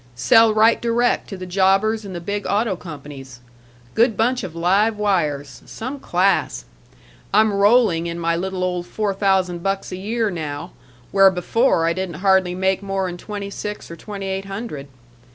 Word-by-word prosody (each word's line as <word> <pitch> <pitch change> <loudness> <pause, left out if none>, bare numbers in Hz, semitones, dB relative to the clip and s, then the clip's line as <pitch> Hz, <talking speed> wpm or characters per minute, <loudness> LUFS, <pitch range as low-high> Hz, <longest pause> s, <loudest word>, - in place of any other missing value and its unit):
Sell 225 - +5
right 220 +2 +4
direct 235 +1 +1
to 195 - -6
the 185 - -7
jobbers 195 +4 +2
and 195 -3 -8
the - - -4
big 200 +4 -4
auto 205 -1 +1
companies. 140 -6 -10 0.5
Good 230 0 +2
bunch 245 +3 +1
of 175 -4 -7
live 200 +6 +2
wires. 160 -9 -1
Some 255 +5 -6
class! 180 - 0 0.7
I'm 215 +1 +4
rolling 200 -4 +3
in 170 0 -4
my 170 0 0
little 185 +1 -3
old 180 -1 -2
four 210 -2 -2
thousand 190 -3 +1
bucks 195 +1 -2
a 185 - -5
year 220 +2 -1
now, 150 -4 -5 0.4
where 195 -1 +6
before 185 0 +1
I 165 - +2
didn't 185 -2 -4
hardly 190 0 +2
make 190 +1 0
more 195 -1 -2
'n 175 -1 -6
twenty 200 +1 -6
six 210 -3 -6
or - - -7
twenty 200 +2 -7
eight 190 0 -3
hundred. 195 -8 -6
195 Hz, 170 wpm, -21 LUFS, 175-210 Hz, 0.7 s, where